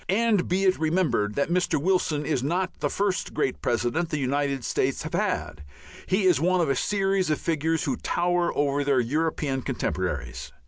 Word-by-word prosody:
And 210 Hz, -1 st, +2 dB
be 185 Hz, +2 st, +1 dB
it 185 Hz, -1 st, +3 dB
remembered 155 Hz, -, +1 dB
that 140 Hz, +4 st, 0 dB
Mr. 180 Hz, -4 st, +1 dB
Wilson 160 Hz, -3 st, +1 dB
is 140 Hz, -4 st, 0 dB
not 180 Hz, +7 st, -2 dB
the -, -, 0 dB
first 200 Hz, -2 st, -1 dB
great 135 Hz, -4 st, -1 dB
President 120 Hz, +8 st, 0 dB
the 155 Hz, -, -1 dB
United 140 Hz, -1 st, -1 dB
States 130 Hz, +1 st, 0 dB
have 155 Hz, -, -6 dB
had, 180 Hz, -, -1 dB, 0.5 s
he 190 Hz, +2 st, +1 dB
is 180 Hz, -6 st, +4 dB
one 180 Hz, +2 st, +2 dB
of 160 Hz, -5 st, +2 dB
a -, -, +1 dB
series 195 Hz, -3 st, 0 dB
of 155 Hz, -, +1 dB
figures 160 Hz, 0 st, 0 dB
who -, -, 0 dB
tower 175 Hz, 0 st, 0 dB
over 145 Hz, 0 st, +1 dB
their 140 Hz, -2 st, +2 dB
European 145 Hz, +1 st, -1 dB
contemporaries. -, -, -3 dB
160 Hz, 180 wpm, -26 LUFS, 140-185 Hz, 0.5 s, is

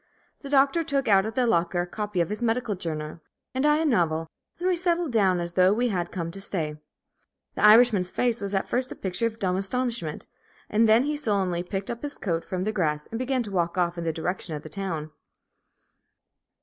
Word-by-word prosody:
The 280 Hz, -, -8 dB
Doctor 280 Hz, +4 st, +3 dB
took 280 Hz, -3 st, -1 dB
out 195 Hz, -1 st, +4 dB
of 220 Hz, -, -6 dB
the 255 Hz, -, +2 dB
locker 175 Hz, -4 st, +1 dB
a -, -, -2 dB
copy 205 Hz, 0 st, -2 dB
of 170 Hz, -, -1 dB
his 210 Hz, +3 st, -3 dB
medical 235 Hz, -1 st, 0 dB
journal 155 Hz, -3 st, -5 dB, 0.3 s
and 260 Hz, +3 st, +1 dB
I 300 Hz, 0 st, +4 dB
a 320 Hz, -, 0 dB
novel, 165 Hz, -, +1 dB, 0.3 s
and 355 Hz, -, -2 dB
we 370 Hz, -, +3 dB
settled 345 Hz, -3 st, 0 dB
down 195 Hz, -6 st, +3 dB
as 170 Hz, 0 st, -2 dB
though 185 Hz, +1 st, +5 dB
we 245 Hz, +2 st, +1 dB
had 175 Hz, -4 st, -2 dB
come 170 Hz, -3 st, -4 dB
to 195 Hz, +3 st, -8 dB
stay. 160 Hz, -6 st, -3 dB, 0.8 s
The -, -, -3 dB
Irishman's 210 Hz, -4 st, +6 dB
face 240 Hz, +1 st, 0 dB
was 200 Hz, 0 st, -3 dB
at 195 Hz, -, 0 dB
first 255 Hz, +1 st, 0 dB
a -, -, -5 dB
picture 195 Hz, +5 st, -1 dB
of 225 Hz, -1 st, -7 dB
dumb 185 Hz, -4 st, 0 dB
astonishment, 210 Hz, -5 st, -2 dB, 0.5 s
and 220 Hz, +1 st, +4 dB
then 225 Hz, +3 st, +6 dB
he 300 Hz, +2 st, -1 dB
sullenly 195 Hz, -10 st, 0 dB
picked 195 Hz, +3 st, -4 dB
up 235 Hz, -, -6 dB
his 290 Hz, -1 st, -6 dB
coat 170 Hz, -4 st, -2 dB
from 185 Hz, -1 st, -3 dB
the 215 Hz, -, 0 dB
grass, 150 Hz, -6 st, 0 dB
and 225 Hz, -, -3 dB
began 255 Hz, 0 st, 0 dB
to 210 Hz, -, -7 dB
walk 175 Hz, -2 st, -1 dB
off 175 Hz, -1 st, +1 dB
in 170 Hz, -, -4 dB
the 165 Hz, -, 0 dB
direction 165 Hz, 0 st, -3 dB
of 150 Hz, -, -7 dB
the 155 Hz, -, -9 dB
town. 165 Hz, -6 st, -4 dB
200 Hz, 220 wpm, -26 LUFS, 175-245 Hz, 0.8 s, Irishman's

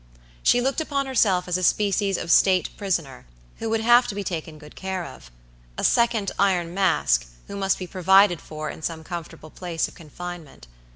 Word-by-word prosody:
She 245 Hz, -, +4 dB
looked 270 Hz, +5 st, 0 dB
upon 280 Hz, -3 st, -2 dB
herself 200 Hz, -9 st, +2 dB
as 180 Hz, 0 st, 0 dB
a -, -, -4 dB
species 200 Hz, 0 st, +2 dB
of 165 Hz, -, -3 dB
state 185 Hz, 0 st, +3 dB
prisoner, 165 Hz, -, -3 dB, 0.3 s
who 225 Hz, -, -3 dB
would 225 Hz, 0 st, 0 dB
have 240 Hz, +2 st, +5 dB
to 200 Hz, -, -5 dB
be 205 Hz, -, -3 dB
taken 160 Hz, -4 st, -5 dB
good 150 Hz, 0 st, -14 dB
care 190 Hz, -2 st, -4 dB
of. 130 Hz, -, -12 dB, 0.5 s
A -, -, -4 dB
second 235 Hz, -4 st, +2 dB
Iron 175 Hz, -4 st, +1 dB
Mask, 70 Hz, -, +2 dB, 0.2 s
who 200 Hz, -, -8 dB
must 195 Hz, -1 st, 0 dB
be 185 Hz, -, -6 dB
provided 190 Hz, 0 st, +4 dB
for 155 Hz, -1 st, -6 dB
in -, -, -11 dB
some 160 Hz, 0 st, -4 dB
comfortable 165 Hz, -2 st, -8 dB
place 175 Hz, -3 st, -3 dB
of -, -, -14 dB
confinement. 170 Hz, -, -9 dB
185 Hz, 185 wpm, -24 LUFS, 165-200 Hz, 0.5 s, have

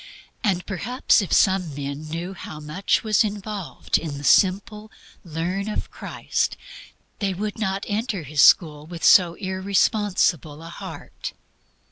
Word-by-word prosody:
And 190 Hz, -5 st, +1 dB
perhaps 225 Hz, +5 st, +1 dB
if 195 Hz, -, -5 dB
some 185 Hz, -6 st, +3 dB
men 140 Hz, +2 st, -5 dB
knew 170 Hz, +4 st, -4 dB
how 155 Hz, -4 st, -9 dB
much 155 Hz, +6 st, 0 dB
was 215 Hz, -1 st, +3 dB
involved 205 Hz, -2 st, -2 dB
in 155 Hz, -3 st, -5 dB
the 145 Hz, -, -8 dB
simple 205 Hz, +6 st, +2 dB, 0.3 s
"learn" 180 Hz, +4 st, -3 dB
of 210 Hz, -, -4 dB
Christ, -, -, -2 dB, 0.6 s
they 195 Hz, -2 st, -1 dB
would 210 Hz, +3 st, -4 dB
not 195 Hz, -2 st, -1 dB
enter 210 Hz, -3 st, -2 dB
His 150 Hz, 0 st, +1 dB
school 150 Hz, -3 st, +5 dB
with 170 Hz, -1 st, -8 dB
so 175 Hz, -3 st, +6 dB
irresponsible 190 Hz, -, 0 dB
a 165 Hz, -, -9 dB
heart. 170 Hz, -, -8 dB
190 Hz, 135 wpm, -23 LUFS, 160-205 Hz, 0.6 s, so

